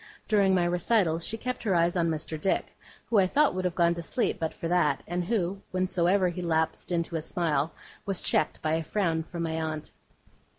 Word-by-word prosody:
During 200 -3 +4
my 175 -1 +2
recital, 175 -1 +2
she 210 +6 -2
kept 250 +2 -4
her 200 -5 +1
eyes 170 +1 +2
on 170 -2 +2
Mr. 155 0 -3
Dick, 195 - -1 0.3
who 225 - +3
I 185 - +4
thought 295 +9 +3
would 185 0 -2
have 180 - -1
gone 170 0 +3
to 170 - -5
sleep 235 +8 -1
but 160 -1 -1
for 165 - -5
that, 170 -4 +2
and 175 +1 -1
who, 195 -2 -1
whensoever 185 +1 +2
he 175 +1 -5
lapsed 160 0 -1
into 170 -1 -1
a - - -3
smile, 155 -2 0 0.3
was 195 -2 -1
checked 155 - +1
by 155 0 +1
a 165 0 0
frown 165 -3 0
from 170 +1 -5
my 160 0 -2
aunt. 155 -1 -4
175 Hz, 210 wpm, -28 LUFS, 165-190 Hz, 0.3 s, During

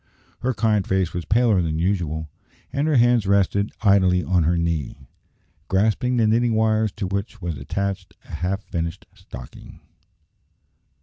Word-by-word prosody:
Her 130 0 -1
kind 105 -2 +1
face 95 -2 0
was 85 -1 -4
paler 110 -4 +3
than 80 -2 -1
usual, 80 -3 -1 0.5
and 140 +3 0
her 155 - +2
hands 120 -4 +4
rested 100 +1 +2
idly 95 -3 +4
on 90 -4 +1
her 85 +2 +2
knee, 80 -5 -3 0.6
grasping 110 +6 +1
the 115 - +3
knitting 115 +1 +2
wires 110 -1 +2
to 105 - -4
which 100 +3 -4
was 85 -4 -4
attached 95 +7 -4
a - - -14
half 95 +4 -2
finished 85 -1 -4
stocking. 65 -1 -12
100 Hz, 145 wpm, -22 LUFS, 85-110 Hz, 0.6 s, hands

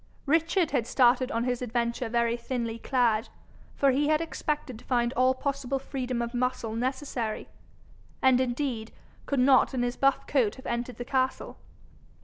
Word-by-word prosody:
Richard 330 +3 +2
had 245 -5 0
started 250 0 +3
on 230 - 0
his 250 0 -1
adventure 235 0 -1
very 235 0 +1
thinly 235 -1 -3
clad, 230 -4 +1 0.5
for 275 -1 +3
he 285 +3 +1
had 305 0 +3
expected 300 -6 -3
to - - -17
find 240 -1 +1
all 255 +1 +3
possible 275 -1 -2
freedom 255 -3 -3
of 235 +1 -5
muscle 245 -2 -1
necessary, 245 -2 -3 0.7
and 260 -1 +4
indeed 245 -3 -2 0.4
could 280 - 0
not 265 +1 +4
in 245 - 0
his 245 0 -2
buff 275 0 +2
coat 245 -8 +1
have 260 - -13
entered 240 +1 -3
the 245 - -5
castle. 260 0 -1
250 Hz, 160 wpm, -28 LUFS, 235-270 Hz, 0.7 s, and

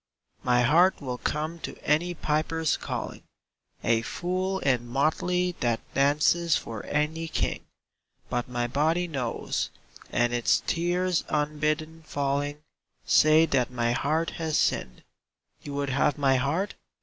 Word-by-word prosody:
My 125 0 +3
heart 170 +9 +4
will 125 -3 -5
come 155 +3 -2
to - - -7
any 175 +4 +1
piper's 155 +1 0
calling, - - -5 0.6
A 115 -1 +3
fool 185 +8 -2
in 125 -8 0
motley 175 +7 +1
that 120 -2 +1
dances 150 +4 +3
for 110 -3 -6
any 155 +2 -1
king; - - -2 0.6
But 120 0 -2
my 120 -1 -1
body 160 +8 +1
knows, 130 -8 -2 0.4
and 120 0 +1
its 120 -1 +2
tears 175 +1 0
unbidden 155 +2 -1
falling 145 0 -2 0.4
Say 155 +1 +6
that 130 -6 +1
my 120 -1 0
heart 155 +7 0
has 160 -2 0
sinned. - - 0 0.6
You 145 - -7
would 140 -1 -1
have 140 +3 +2
my 135 -2 +3
heart? 160 +10 -1
150 Hz, 130 wpm, -27 LUFS, 130-165 Hz, 0.6 s, Say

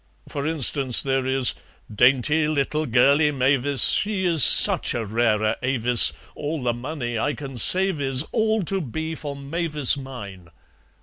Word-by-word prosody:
For 140 +1 -6
instance, 140 -4 0
there 135 -1 -3
is: 130 -1 0 0.4
'Dainty 135 +7 +1
little 155 +1 -3
girlie 140 +5 +2
Mavis, 135 -1 0
She 205 -3 -2
is 165 -6 +4
such - - +7
a 115 -2 -5
rara 110 0 -2
avis, 125 -2 +3 0.2
All 150 -1 -7
the 120 -1 -2
money 120 -2 -7
I 145 - -3
can 135 -2 -10
save 185 - +1
is 135 0 0
All 220 -2 -2
to 195 +3 -3
be 160 +3 -7
for 145 -3 -9
Mavis 150 0 -1
mine.' 100 -10 -11
140 Hz, 145 wpm, -21 LUFS, 125-155 Hz, 0.4 s, such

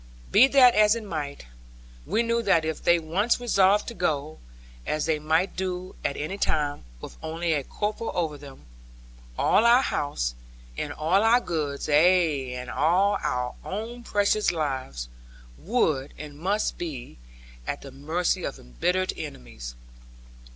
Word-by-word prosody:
Be 260 - +7
that 260 -3 +6
as 210 +1 +5
it 230 - -5
might, 150 - -5 0.6
we 230 - +1
knew 235 0 +1
that 180 -7 +3
if 160 -1 -3
they 175 - +5
once 180 +10 0
resolved 205 -4 +3
to - - -7
go 155 -6 -2 0.4
(as 150 - -1
they 155 -1 +1
might 160 +5 +1
do 185 0 -4
at 140 - -1
any 190 +7 -4
time, 145 - 0
with - - -10
only 165 +1 -1
a 145 -3 -1
corporal 210 - -3
over 160 -4 -1
them) 140 -2 -13 0.7
all 215 - +4
our 240 +3 +6
house, - - -1 0.4
and 145 - -4
all 165 +7 +2
our 225 +2 +5
goods, 150 - -3
ay, 155 -4 +3
and 125 0 -6
our 165 -7 +1
own 225 +5 -5
precious 210 -1 +1
lives, 130 - -3 0.5
would 155 - 0
and 150 -1 -9
must 200 +5 -1
be 140 - -6 0.5
at 140 - -3
the 135 - -9
mercy 155 +6 -1
of - - -4
embittered 180 - -1
enemies. - - -8
165 Hz, 145 wpm, -26 LUFS, 145-205 Hz, 0.7 s, Be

